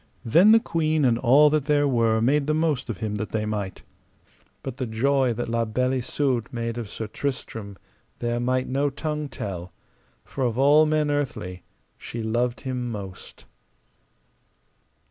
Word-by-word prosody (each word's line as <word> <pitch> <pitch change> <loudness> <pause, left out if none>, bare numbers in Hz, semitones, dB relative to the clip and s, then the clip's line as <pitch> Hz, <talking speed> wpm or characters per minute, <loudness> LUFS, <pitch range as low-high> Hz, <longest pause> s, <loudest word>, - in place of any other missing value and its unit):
Then 170 - +6
the 225 - +7
queen 155 - 0
and 120 -2 +3
all 140 +5 +6
that 150 -2 +1
there 145 -1 +3
were 115 -4 +2
made 140 +4 +2
the 155 - +2
most 155 -6 0
of 110 - -3
him 110 -2 -3
that 105 +1 -4
they 110 -1 -1
might. 105 -3 -4 0.8
But 130 -2 -6
the 130 -3 -3
joy 130 +3 +2
that 120 +2 -4
La 115 0 0
Beale 125 +4 0
Isoud 125 -2 -1
made 115 -1 -3
of 110 -4 -6
Sir 110 - -5
Tristram 110 -4 -5 0.4
there 120 0 -1
might 130 +1 0
no 140 +2 +1
tongue 150 +1 -4
tell, 90 -6 -6 0.5
for 135 - -4
of 120 -2 0
all 145 +3 +5
men 150 -1 +1
earthly 115 -11 -3 0.4
she 115 -1 -6
loved 120 +2 -1
him 125 -3 -3
most. 100 -4 -8
125 Hz, 165 wpm, -25 LUFS, 110-145 Hz, 0.8 s, the